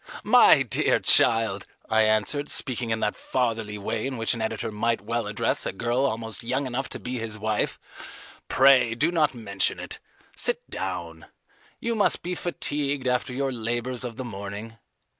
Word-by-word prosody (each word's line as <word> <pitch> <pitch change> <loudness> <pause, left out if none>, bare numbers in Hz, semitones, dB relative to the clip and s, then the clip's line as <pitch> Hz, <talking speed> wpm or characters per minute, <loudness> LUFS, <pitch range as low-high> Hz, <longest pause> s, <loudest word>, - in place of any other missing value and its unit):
"My - - +6
dear - - +2
child," 115 -4 +3 0.2
I 110 0 +3
answered, 110 +7 +1
speaking 125 -3 +1
in 110 0 -1
that 105 - 0
fatherly 115 -4 -2
way 110 +4 -3
in 135 -2 -4
which 115 +1 0
an 115 - -5
editor 110 +1 -3
might 115 +2 0
well 115 +1 -2
address 105 0 0
a - - -1
girl 120 +7 0
almost 110 0 -4
young 130 +4 -1
enough 130 +1 -3
to - - -7
be 125 0 -4
his 110 -1 -5
wife, 110 0 -1 0.7
"pray 130 -3 +5
do 155 +8 +1
not 155 -6 +1
mention 100 -4 0
it. - - -7 0.4
Sit 485 0 0
down. - - -5 0.5
You 235 - -1
must 215 -3 +2
be 180 - -3
fatigued 145 -6 -2
after 125 +1 0
your 135 +1 -1
labours 120 +1 -3
of 120 -2 -6
the 130 - -5
morning. 105 +1 -7
120 Hz, 170 wpm, -25 LUFS, 110-130 Hz, 0.7 s, My